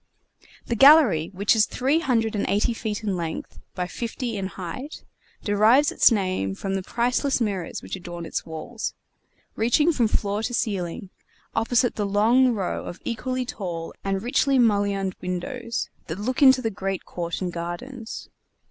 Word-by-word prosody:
The 235 - -1
gallery, 260 - +6
which 200 +3 +2
is 215 -1 +4
three 275 +5 +1
hundred 225 -7 0
and 205 - 0
eighty 205 +4 +2
feet 220 -1 -4
in 200 -3 -1
length 165 -2 -5 0.2
by 180 - -1
fifty 235 +5 -4
in 195 -2 -2
height, 190 - -7 0.4
derives 220 +8 +4
its - - +5
name 185 - 0
from 195 - -4
the 195 - -1
priceless 245 +7 0
mirrors 200 -7 -2
which - - -5
adorn 175 -2 -7
its - - -3
walls, 165 +8 -5 0.6
reaching 245 +9 +3
from 240 -6 +2
floor 205 -1 -1
to 245 +2 -2
ceiling, 190 -4 -2 0.4
opposite 235 +2 +1
the 205 -2 0
long 225 +6 +4
row 205 -6 -2
of 175 - -8
equally 255 +2 -2
tall 175 -8 -5
and 195 0 -1
richly 270 +3 +2
mullioned 200 -4 +2
windows 230 +7 -4 0.2
that 160 - -4
look 250 +6 -2
into 260 -2 +7
the 225 - 0
great 195 -1 -4
court 170 -1 -4
and 180 -2 -3
gardens. 175 +8 -6
210 Hz, 160 wpm, -24 LUFS, 185-245 Hz, 0.6 s, into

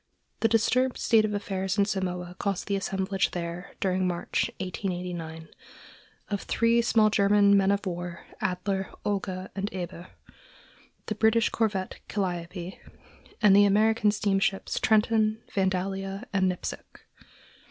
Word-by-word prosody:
The 225 - +3
disturbed 240 +3 +2
state 220 -2 +4
of 210 - -2
affairs 195 -1 -2
in 200 - +4
Samoa 180 -3 -3
caused 200 -2 -1
the 200 - -1
assemblage 190 0 -1
there, 170 +1 -6
during 185 -1 +1
March, 175 -1 -1
1889, 175 -4 -4 0.8
of 200 -2 -2
three 230 0 +2
small 220 -2 +3
German 200 0 +5
men 195 -1 +4
of 200 +1 +1
war, 175 -1 -5 0.2
Adler, 190 +1 -1 0.2
Olga, 190 -2 -2
and 200 +1 -2
Eber, 175 -1 -6 1.0
the - - -2
British 220 +1 +3
corvette 205 -4 -1
Calliope, 180 -2 -4 0.6
and 200 -2 +7
the 205 0 +7
American 215 +2 +3
steamships 200 -1 0
Trenton, 220 0 +2
Vandalia 195 +1 -1
and 190 -1 +3
Nipsic. 180 - -7
195 Hz, 125 wpm, -27 LUFS, 185-210 Hz, 1.0 s, and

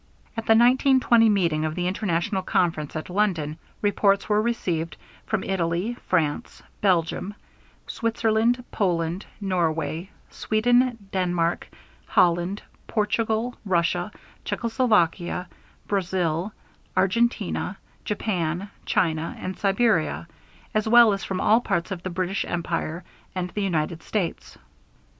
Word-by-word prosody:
At 225 -1 -4
the 225 - +6
1920 245 -1 +5
meeting 170 -7 +2
of 155 0 -2
the 180 - -1
international 190 +1 0
conference 165 -5 0
at 155 - -4
London, 170 -6 0 0.2
reports 200 -1 +2
were 210 0 +3
received 170 -9 -2 0.3
from 220 -3 -1
Italy, 180 +3 -1
France, 155 -5 -1 0.2
Belgium, 185 +1 +1 0.5
Switzerland, 230 +1 +1
Poland, 175 -1 -1
Norway, 165 -3 -1 0.2
Sweden, 245 +3 +2
Denmark, 175 -2 0 0.4
Holland, 175 +3 +2 0.2
Portugal, 225 +2 0
Russia, 175 0 0 0.3
Czechoslovakia, 205 -7 +1 0.4
Brazil, 180 -1 -1 0.5
Argentina, 230 +6 +1 0.3
Japan, 190 -2 -2 0.2
China, 165 -5 0
and 185 0 -4
Siberia, 195 -5 +1 0.5
as 215 0 +1
well 235 -2 +7
as 195 - -4
from 190 -1 -3
all 220 +5 +4
parts 170 -5 -1
of 185 -3 -4
the 185 - -4
British 185 +2 -1
Empire, 170 0 -3 0.3
and 180 -1 -3
the 210 - -3
United 165 -3 -1
States. 190 -3 -3
190 Hz, 110 wpm, -25 LUFS, 170-215 Hz, 0.5 s, well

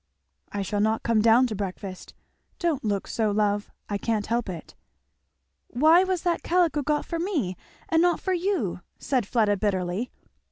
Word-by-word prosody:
"I 200 -1 -2
shall 205 +2 -2
not 220 +2 +1
come 230 -2 +2
down 230 +3 +6
to 225 -4 -3
breakfast. 190 -1 -6 0.4
Don't 335 -6 -1
look 205 -3 -1
so, 220 -2 0
love! 205 0 0 0.2
I 205 -1 -2
can't 220 -2 -1
help 235 -2 -1
it." 170 -3 -7 0.9
"Why 315 +8 +5
was 370 -2 -1
that 345 -2 0
calico 340 -4 +2
got 295 +1 0
for 335 - -3
me 310 - -1 0.3
and 330 -4 +3
not 350 -1 +3
for 375 - -1
you?" 350 - -1 0.2
said 255 -7 -1
Fleda, 210 -4 +2
bitterly. 190 +2 -1
230 Hz, 165 wpm, -26 LUFS, 205-325 Hz, 0.9 s, down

